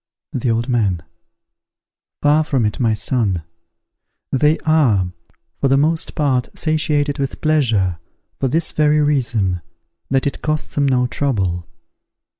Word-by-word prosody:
The 125 -1 -1
Old 115 +1 0
Man. 100 -9 0 1.2
Far 150 +2 +4
from 135 -6 0
it, 105 - -2
my 115 -4 +2
son! 105 -7 0 0.9
They 150 +4 +3
are, 120 - +3 0.5
for 140 - +2
the 135 +1 +3
most 160 +3 +1
part 130 -4 +1
satiated 150 -2 +1
with 135 -1 -3
pleasure, 110 - +1 0.4
for 135 - +1
this 160 +5 0
very 150 0 +3
reason, 115 - +1 0.5
that 135 0 +1
it 140 - -3
costs 155 0 -2
them 140 -1 +1
no 125 -2 +2
trouble. 95 -11 -1
135 Hz, 130 wpm, -19 LUFS, 110-150 Hz, 1.2 s, Far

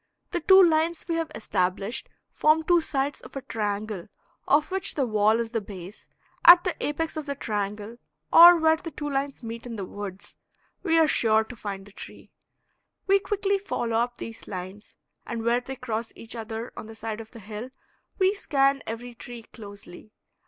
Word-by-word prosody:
The 350 - 0
two 380 +3 +8
lines 330 0 +2
we 335 - -1
have 330 -1 -1
established 195 +2 -1 0.2
form 310 +1 +3
two 345 +1 +4
sides 280 -2 -2
of - - -13
a 275 - -5
triangle 210 -3 -3 0.4
of 300 +5 +3
which 380 0 -2
the 275 - +1
wall 215 0 +3
is 230 -1 -3
the 225 -2 -1
base; 195 -1 -10 0.3
at 345 +1 +10
the 365 - -1
apex 315 +2 -2
of 305 -1 -5
the 280 - -2
triangle, 210 -1 -4 0.4
or 345 +1 +10
where 320 0 +4
the 330 - -7
two 295 -1 -6
lines 275 -2 -3
meet 230 +1 -7
in 235 - -6
the 200 -3 -4
woods, 195 -1 -8 0.4
we 330 -4 +2
are 320 -1 +5
sure 220 -5 +3
to 230 +3 -11
find 200 -3 -6
the 205 - -15
tree. - - -12 0.7
We 395 0 +4
quickly 400 0 0
follow 235 - -2
up 240 +1 -1
these 230 0 -9
lines, 190 +2 -8 0.3
and 230 -1 -4
where 235 +1 +2
they 265 +2 -7
cross 230 -3 -4
each 230 +1 -8
other 225 +1 -6
on - - -8
the 225 - -10
side 220 0 -5
of 220 - -12
the 230 - -12
hill 215 +4 -7 0.5
we 380 0 +3
scan 275 -8 +1
every 240 +2 -6
tree 235 0 -10
closely. 205 -2 -12
235 Hz, 190 wpm, -26 LUFS, 215-315 Hz, 0.7 s, at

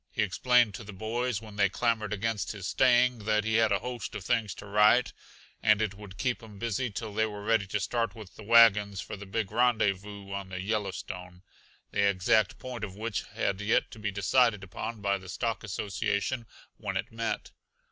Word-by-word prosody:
He 110 - 0
explained 120 +2 +3
to 110 - -7
the 105 0 -9
boys, 115 +2 -2
when 105 -2 -11
they 100 -1 +4
clamored 110 0 0
against 105 -2 -1
his 100 -3 -7
staying, 125 +1 +4
that 105 0 +2
he 110 +1 +1
had 110 -2 +3
a 100 - +4
host 125 -2 -5
of 95 - -6
things 115 -6 0
to - - -10
write, 105 +4 +4 0.5
and 105 -1 +4
it 110 -3 0
would 100 -2 -11
keep 125 +1 -1
him 110 -3 -12
busy 115 +3 -1
till 105 0 -6
they 110 +1 +2
were 105 -1 -7
ready 110 -2 +2
to 105 +2 -1
start 115 +4 -1
with 105 -5 -11
the - - -11
wagons 105 -3 +5
for - - -5
the 100 0 -10
big 100 0 -2
rendezvous 105 -4 +1
on 100 -1 -4
the 90 -1 -5
Yellowstone, 95 -3 -4 0.5
the - - +1
exact 105 +2 +2
point 125 -3 -7
of 95 -3 -5
which 110 0 -3
had 100 0 -1
yet 110 +2 +1
to 110 - -10
be 105 -1 -1
decided 105 +2 +2
upon 105 +4 -6
by 100 -1 +1
the 95 -1 -12
Stock 115 +7 -2
Association 105 +3 -2 0.3
when - - -3
it - - -4
met. 115 0 -3
105 Hz, 200 wpm, -29 LUFS, 100-115 Hz, 0.5 s, wagons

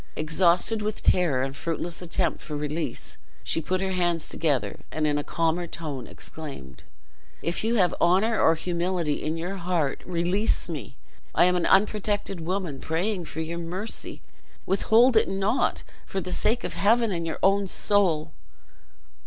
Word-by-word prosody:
Exhausted 175 +7 +3
with 215 0 -3
terror 155 -8 +3
and 135 0 -3
fruitless 170 +2 -3
attempt 175 -2 -1
for 150 -2 -6
release, 150 +2 -4 0.2
she 165 - 0
put 185 +4 -1
her 190 0 -1
hands 175 -3 0
together, 135 -11 -1
and 155 0 -1
in 145 -1 +1
a - - -3
calmer 165 +2 0
tone 150 -7 -6
exclaimed: 135 - -8 0.6
"If 170 +4 0
you 230 +2 +1
have 185 -6 +3
honor 195 +6 +3
or 165 - +5
humanity 170 -2 -1
in 155 +2 -2
your 180 +4 -4
heart, 170 -6 -1
release 180 +5 0
me! 150 - -7 0.4
I - - +6
am 180 0 +3
an 175 - +1
unprotected 205 -2 +1
woman, 175 -4 -3
praying 175 +3 -1
for 160 - -5
your 165 +1 -4
mercy; 180 +6 -5 0.4
withhold 230 +6 +4
it 220 - +4
not, 195 +6 0 0.2
for 195 - -2
the 180 0 -4
sake 235 +6 +1
of - - -3
Heaven 230 +2 +3
and 170 -2 -2
your 160 - -3
own 195 +1 +3
soul." 175 -6 +1
175 Hz, 160 wpm, -26 LUFS, 160-195 Hz, 0.6 s, I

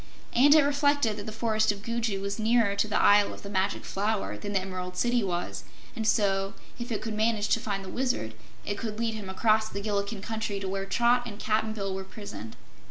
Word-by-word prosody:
And 285 +5 +7
it 310 - +7
reflected 285 -5 +2
that 205 - -6
the - - -4
Forest 220 -1 +1
of 200 -1 -8
Gugu 230 -3 -1
was 200 +2 -3
nearer 220 -2 +3
to 215 - +1
the 210 - +1
Isle 205 0 +5
of - - -14
the 200 - -7
Magic 190 0 0
Flower 205 +1 -1
than 205 -1 -5
the 195 - +3
Emerald 185 -1 -5
City 240 -1 +2
was, 175 -2 -3 0.3
and 220 -3 -2
so, 195 -3 +2 0.2
if 240 +1 -5
it 215 - -2
could 220 0 -3
manage 215 -1 +1
to - - +3
find 200 -3 -3
the - - -7
Wizard, 245 - -1 0.3
it 205 - -3
could 215 -2 -4
lead 230 0 0
him 210 -3 -6
across 215 +2 +2
the 200 - -5
Gillikin 200 0 -2
Country 220 -2 -3
to 195 - -4
where 195 0 -2
Trot 240 +4 +3
and 205 -3 -7
Cap'n 215 0 0
Bill 195 -3 -3
were 190 0 -4
prisoned. 115 - -9
210 Hz, 225 wpm, -28 LUFS, 195-225 Hz, 0.3 s, And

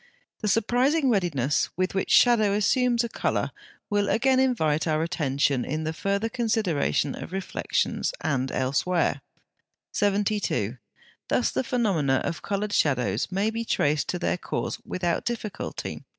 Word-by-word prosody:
The 215 - -2
surprising 250 +7 +2
readiness 150 - +1
with 185 +1 0
which 190 - -1
shadow 220 -5 +5
assumes 240 +3 +2
a - - -1
colour - - -1 0.4
will 205 -1 +1
again 260 +2 +3
invite 160 - +1
our 155 0 +1
attention 140 -6 0
in 155 +3 -3
the 160 +1 -2
further 200 +6 -1
consideration 215 - 0
of - - -8
reflections 190 0 -1
and 130 -2 -1
elsewhere. 140 +3 0 0.7
72. 200 - 0 0.5
Thus - - +1
the 130 - -1
phenomena 180 - +1
of 165 - -3
coloured 205 +1 -2
shadows 125 - +1
may 200 +4 +1
be 230 +1 -3
traced 150 -8 +1
to 180 - -1
their 180 0 -1
cause - - -3
without 175 -2 -1
difficulty. 225 -4 -5
190 Hz, 135 wpm, -26 LUFS, 150-220 Hz, 0.7 s, shadow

